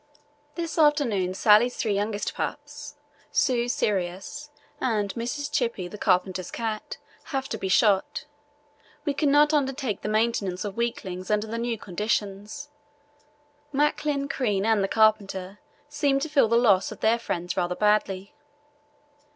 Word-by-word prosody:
"This 335 Hz, -1 st, -3 dB
afternoon 235 Hz, -, +2 dB
Sallie's 215 Hz, +5 st, +5 dB
three 215 Hz, -3 st, 0 dB
youngest 205 Hz, +1 st, -2 dB
pups, -, -, -6 dB, 0.4 s
Sue's 245 Hz, -1 st, +2 dB
Sirius, 195 Hz, +9 st, -2 dB, 0.3 s
and 210 Hz, -5 st, 0 dB
Mrs. 285 Hz, +5 st, -4 dB
Chippy, 230 Hz, -7 st, -1 dB
the 210 Hz, +3 st, -10 dB
carpenter's 185 Hz, -1 st, +1 dB
cat, 220 Hz, -2 st, -4 dB, 0.3 s
have 270 Hz, -1 st, -3 dB
to 220 Hz, -, -3 dB
be 190 Hz, -, -3 dB
shot. 200 Hz, +4 st, +2 dB, 0.8 s
We 290 Hz, -, +1 dB
could 290 Hz, +1 st, +1 dB
not 295 Hz, +2 st, +5 dB
undertake 270 Hz, -6 st, 0 dB
the -, -, -3 dB
maintenance 215 Hz, -4 st, 0 dB
of 200 Hz, -1 st, -5 dB
weaklings 190 Hz, -6 st, -3 dB
under 210 Hz, 0 st, +1 dB
the 230 Hz, +1 st, -4 dB
new 235 Hz, -1 st, -1 dB
conditions. 210 Hz, +7 st, -3 dB, 1.0 s
Macklin, 290 Hz, 0 st, 0 dB
Crean, 215 Hz, -8 st, 0 dB
and 220 Hz, -3 st, +3 dB
the -, -, +1 dB
carpenter 205 Hz, -3 st, +1 dB, 0.3 s
seemed 285 Hz, -1 st, +1 dB
to 315 Hz, -, -3 dB
feel 280 Hz, -6 st, +4 dB
the 230 Hz, +1 st, +3 dB
loss 205 Hz, -6 st, +3 dB
of -, -, -10 dB
their 230 Hz, +2 st, +3 dB
friends 175 Hz, -5 st, -3 dB
rather 180 Hz, -1 st, 0 dB
badly. 205 Hz, -2 st, +1 dB
220 Hz, 140 wpm, -26 LUFS, 195-270 Hz, 1.0 s, Sallie's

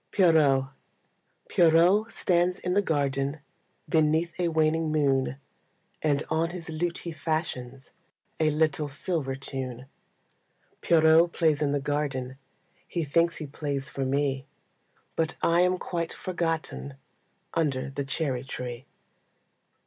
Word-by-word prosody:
Pierrot 155 Hz, -8 st, +4 dB, 0.8 s
Pierrot 175 Hz, +6 st, +4 dB
stands 180 Hz, 0 st, +1 dB
in 180 Hz, -, -2 dB
the 200 Hz, -, +4 dB
garden 140 Hz, -3 st, -1 dB, 0.5 s
Beneath 160 Hz, +1 st, +2 dB
a 175 Hz, -, +2 dB
waning 160 Hz, 0 st, +1 dB
moon, 135 Hz, -4 st, +1 dB, 0.7 s
And 145 Hz, -1 st, +1 dB
on 160 Hz, +1 st, 0 dB
his 175 Hz, -2 st, -7 dB
lute 170 Hz, +2 st, -1 dB
he 170 Hz, -, -6 dB
fashions 145 Hz, -5 st, -4 dB, 0.5 s
A 155 Hz, -1 st, +3 dB
little 155 Hz, -1 st, +1 dB
silver 145 Hz, -2 st, -2 dB
tune. 130 Hz, -2 st, -5 dB, 1.0 s
Pierrot 165 Hz, +1 st, +5 dB
plays 155 Hz, -3 st, +2 dB
in 145 Hz, -2 st, +1 dB
the 145 Hz, -, +1 dB
garden, 135 Hz, -2 st, -2 dB, 0.5 s
He 170 Hz, -, -2 dB
thinks 170 Hz, +4 st, +2 dB
he 155 Hz, -, -5 dB
plays 140 Hz, 0 st, -4 dB
for 135 Hz, -, -3 dB
me, 135 Hz, 0 st, 0 dB, 0.7 s
But 160 Hz, -1 st, 0 dB
I 170 Hz, +1 st, +4 dB
am 180 Hz, 0 st, +3 dB
quite 170 Hz, -2 st, -3 dB
forgotten 165 Hz, -5 st, -3 dB, 0.6 s
Under 140 Hz, -5 st, 0 dB
the 140 Hz, +1 st, -3 dB
cherry 135 Hz, -2 st, -2 dB
tree. 125 Hz, -1 st, -6 dB
155 Hz, 120 wpm, -27 LUFS, 140-165 Hz, 1.0 s, Pierrot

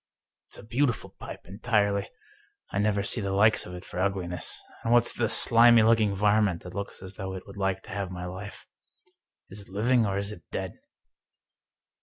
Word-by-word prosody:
It's -, -, -5 dB
a -, -, -12 dB
beautiful 120 Hz, 0 st, -1 dB
pipe, -, -, -8 dB
entirely. 100 Hz, 0 st, 0 dB, 0.6 s
I 100 Hz, -, -1 dB
never 100 Hz, -1 st, +1 dB
see 115 Hz, +2 st, 0 dB
the 100 Hz, -1 st, -2 dB
like 105 Hz, +3 st, +4 dB
of 90 Hz, -, -8 dB
it 90 Hz, -, -10 dB
for -, -, -7 dB
ugliness. 95 Hz, -2 st, -2 dB, 0.2 s
And 115 Hz, -, -1 dB
what's 120 Hz, 0 st, +4 dB
the 115 Hz, -2 st, 0 dB
slimy 115 Hz, 0 st, +6 dB
looking 110 Hz, -3 st, +3 dB
varmint 105 Hz, -3 st, +2 dB
that 90 Hz, -, -9 dB
looks 100 Hz, -1 st, -6 dB
as 95 Hz, 0 st, -10 dB
though 95 Hz, 0 st, -5 dB
it 95 Hz, -, -8 dB
would 100 Hz, -, -12 dB
like 95 Hz, -1 st, -1 dB
to -, -, -12 dB
have 100 Hz, -1 st, -3 dB
my 90 Hz, -1 st, -6 dB
life? 95 Hz, +3 st, -8 dB, 0.9 s
Is 100 Hz, +2 st, -8 dB
it 100 Hz, -, -16 dB
living, 115 Hz, +4 st, +2 dB
or 100 Hz, 0 st, -1 dB
is 100 Hz, +1 st, -2 dB
it 90 Hz, -, -10 dB
dead -, -, -5 dB
100 Hz, 190 wpm, -27 LUFS, 95-110 Hz, 0.9 s, slimy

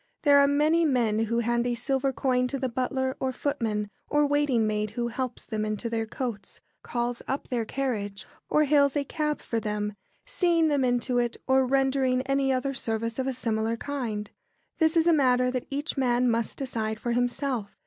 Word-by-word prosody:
There 285 Hz, -2 st, +6 dB
are 280 Hz, -, +6 dB
many 305 Hz, +4 st, +3 dB
men 230 Hz, -7 st, +2 dB
who 235 Hz, +2 st, 0 dB
hand 235 Hz, +1 st, 0 dB
a 240 Hz, -, 0 dB
silver 270 Hz, +3 st, 0 dB
coin 250 Hz, -1 st, +1 dB
to 275 Hz, -, -3 dB
the 265 Hz, -1 st, -1 dB
butler, 260 Hz, +1 st, -1 dB
or 265 Hz, -, 0 dB
footman, 230 Hz, -7 st, -2 dB, 0.2 s
or 295 Hz, 0 st, +3 dB
waiting 285 Hz, -5 st, +2 dB
maid 215 Hz, 0 st, -1 dB
who 235 Hz, 0 st, 0 dB
helps 250 Hz, +1 st, -4 dB
them 215 Hz, -2 st, -2 dB
into 215 Hz, +2 st, -3 dB
their 225 Hz, -1 st, -1 dB
coats, 220 Hz, -5 st, -5 dB, 0.2 s
calls 240 Hz, 0 st, -2 dB
up 270 Hz, -, -3 dB
their 240 Hz, -4 st, -1 dB
carriage, 215 Hz, -6 st, -3 dB, 0.2 s
or 305 Hz, -, +4 dB
hails 285 Hz, -1 st, +3 dB
a 285 Hz, -, +1 dB
cab 300 Hz, +1 st, -2 dB
for 230 Hz, -, -2 dB
them, 210 Hz, -1 st, -2 dB, 0.3 s
seeing 335 Hz, -3 st, +2 dB
them 285 Hz, -3 st, +2 dB
into 245 Hz, 0 st, +1 dB
it, 240 Hz, -1 st, -1 dB
or 265 Hz, 0 st, +3 dB
rendering 265 Hz, -1 st, +2 dB
any 275 Hz, 0 st, +1 dB
other 265 Hz, +1 st, 0 dB
service 230 Hz, -1 st, -3 dB
of 260 Hz, -, -1 dB
a 265 Hz, -, 0 dB
similar 225 Hz, -2 st, -1 dB
kind. 230 Hz, -7 st, -4 dB, 0.5 s
This 320 Hz, 0 st, +3 dB
is 325 Hz, -, +4 dB
a 340 Hz, -, +5 dB
matter 250 Hz, -4 st, +3 dB
that 255 Hz, -1 st, -3 dB
each 285 Hz, +2 st, -3 dB
man 250 Hz, -1 st, +2 dB
must 230 Hz, -1 st, 0 dB
decide 220 Hz, -5 st, -3 dB
for 240 Hz, -, -2 dB
himself. 245 Hz, -2 st, -1 dB
255 Hz, 190 wpm, -27 LUFS, 230-275 Hz, 0.5 s, There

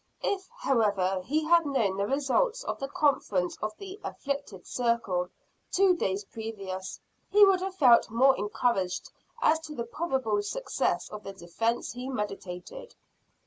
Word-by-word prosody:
If, 380 Hz, -2 st, -1 dB
however, 200 Hz, -, +1 dB
he 305 Hz, +6 st, +1 dB
had 335 Hz, +1 st, +5 dB
known 225 Hz, -9 st, +1 dB
the 200 Hz, 0 st, 0 dB
results 290 Hz, -, +1 dB
of -, -, -4 dB
the 275 Hz, -, -3 dB
conference 235 Hz, -11 st, +1 dB
of 215 Hz, 0 st, -3 dB
the 390 Hz, +1 st, -9 dB
"afflicted 280 Hz, -10 st, -5 dB
circle" 230 Hz, -7 st, 0 dB, 0.4 s
two 380 Hz, -1 st, +4 dB
days 195 Hz, -, -1 dB
previous, 195 Hz, -4 st, -6 dB, 0.3 s
he 415 Hz, 0 st, +8 dB
would 385 Hz, -2 st, +3 dB
have 380 Hz, 0 st, -3 dB
felt 245 Hz, -10 st, +6 dB
more 260 Hz, +4 st, +5 dB
encouraged 205 Hz, -3 st, -1 dB, 0.3 s
as 315 Hz, +1 st, +4 dB
to 315 Hz, -2 st, -9 dB
the 235 Hz, -, -3 dB
probable 250 Hz, -6 st, -1 dB
success -, -, -1 dB
of 210 Hz, -, -7 dB
the 195 Hz, -, -7 dB
defence 195 Hz, +6 st, -2 dB
he 250 Hz, +2 st, -6 dB
meditated. 210 Hz, -, -6 dB
235 Hz, 145 wpm, -28 LUFS, 200-315 Hz, 0.4 s, he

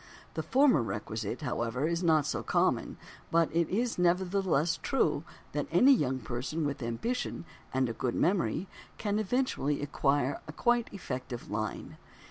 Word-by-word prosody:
The -, -, -2 dB
former 265 Hz, -, +4 dB
requisite, 110 Hz, +1 st, -4 dB
however, 125 Hz, +1 st, -1 dB
is 170 Hz, +1 st, -1 dB
not 160 Hz, -4 st, +4 dB
so -, -, -1 dB
common, -, -, +1 dB, 0.3 s
but 165 Hz, -1 st, +2 dB
it 170 Hz, -1 st, +2 dB
is 230 Hz, +1 st, 0 dB
nevertheless 175 Hz, -2 st, +2 dB
true 270 Hz, -, +1 dB, 0.3 s
that -, -, -2 dB
any 275 Hz, +2 st, +6 dB
young 130 Hz, -, +1 dB
person 130 Hz, +6 st, -3 dB
with 140 Hz, -2 st, -3 dB
ambition 170 Hz, -, -3 dB, 0.3 s
and 130 Hz, 0 st, +1 dB
a 115 Hz, -, -3 dB
good 120 Hz, +2 st, -2 dB
memory 185 Hz, 0 st, +1 dB, 0.3 s
can 205 Hz, 0 st, 0 dB
eventually 215 Hz, -, 0 dB
acquire 145 Hz, -1 st, 0 dB
a 155 Hz, -, -7 dB
quite 240 Hz, +5 st, +2 dB
effective 125 Hz, -, -6 dB
"Line." 105 Hz, 0 st, -4 dB
155 Hz, 145 wpm, -30 LUFS, 125-195 Hz, 0.3 s, any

